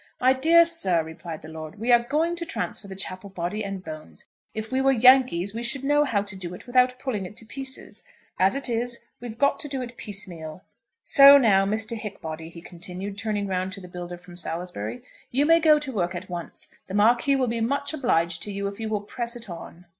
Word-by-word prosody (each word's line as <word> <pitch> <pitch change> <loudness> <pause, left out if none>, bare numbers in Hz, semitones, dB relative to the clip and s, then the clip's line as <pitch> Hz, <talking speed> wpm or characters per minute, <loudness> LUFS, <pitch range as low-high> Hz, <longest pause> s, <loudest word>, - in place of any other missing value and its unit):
"My 255 +1 +5
dear 330 +6 +6
sir," 190 - +1
replied 160 0 -8
the - - -9
lord, 160 +3 -8
"we 230 +4 0
are 240 -1 +7
going 310 +7 0
to 340 - -3
transfer 270 -9 -4
the 190 - -8
chapel 190 +1 -3
body 185 +3 -3
and 195 -2 -5
bones. 155 - -8 0.3
If 220 0 -6
we 260 +1 +1
were 270 0 +4
Yankees 250 -7 +5
we 230 - -4
should 245 +3 -1
know 290 +1 +3
how 205 -7 0
to 205 -1 -5
do 180 -2 -6
it - - -13
without 250 0 +3
pulling 230 -8 -3
it 210 - -10
in 225 - -14
pieces. 270 +2 -5 0.4
As 190 +6 +4
it 275 - -1
is, 235 0 -2
we've 230 -2 -7
got 280 +2 +2
to - - -3
do 275 -2 -4
it 240 -1 -9
piecemeal. 180 -5 -7 0.4
So 280 0 +9
now, 195 -7 +4
Mr. 220 +2 -2
Hickbody," 165 -7 -6
he 170 0 -12
continued, 180 +3 -6
turning 210 -1 -2
round 185 0 -2
to 195 - -6
the 180 - -10
builder 175 0 -7
from 175 0 -14
Salisbury, 165 - -5 0.3
"you 275 +4 +2
may 330 +2 +6
go 310 -2 +6
to 295 -3 -3
work 180 -4 -1
at 180 +1 -7
once. 175 -1 -7 0.2
The 190 - -5
Marquis 235 +6 +4
will 265 -1 +2
be 230 0 -1
much 280 +5 0
obliged 170 - +1
to 205 - -1
you 200 0 -3
if 200 +1 -5
you 220 -1 -3
will 210 -2 -1
press 235 +3 -5
it 235 -5 -7
on." 170 +1 -10
210 Hz, 225 wpm, -25 LUFS, 180-255 Hz, 0.4 s, So